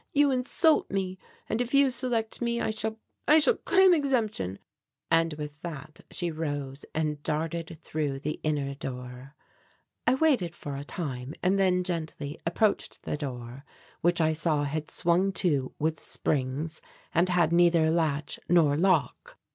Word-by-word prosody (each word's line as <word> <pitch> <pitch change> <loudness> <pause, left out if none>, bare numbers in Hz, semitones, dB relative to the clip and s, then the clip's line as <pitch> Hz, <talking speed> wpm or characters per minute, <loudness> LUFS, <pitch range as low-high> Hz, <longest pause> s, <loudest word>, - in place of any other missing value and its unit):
You 285 -1 +4
insult 265 +5 +3
me. 190 -1 -2 0.3
And 220 - 0
if 245 +2 -1
you 275 -1 +5
select 235 -3 -1
me, 235 0 0
I - - 0
shall 220 0 -2 0.3
I 305 - +7
shall 320 +10 +5
claim 380 -1 +5
exemption, 230 - 0 0.3
" - - -61
and 165 -1 +3
with 150 0 -7
that 155 -2 -8
she 175 -2 -2
rose 145 -3 -4
and 150 -2 -1
darted 165 +2 -2
through 150 -3 -2
the 150 +2 -4
inner 145 -3 -1
door. 125 0 -8 0.7
I - - +5
waited 255 - +2
for 145 -1 -6
a 140 - -5
time 140 -4 -5
and 190 +2 +3
then 180 -1 +3
gently 160 -4 -4
approached 205 +5 0
the - - -2
door, 130 -3 -6 0.4
which 175 +1 +2
I 160 -1 +3
saw 155 -2 +1
had 150 +2 -3
swung 180 +3 +2
to 145 -9 0
with 155 0 -1
springs 145 +3 -2 0.3
and 175 +2 +3
had 175 -2 +2
neither 170 -2 +4
latch 155 -3 0
nor 160 -5 +5
lock. 165 -6 +1
165 Hz, 155 wpm, -28 LUFS, 145-195 Hz, 0.7 s, I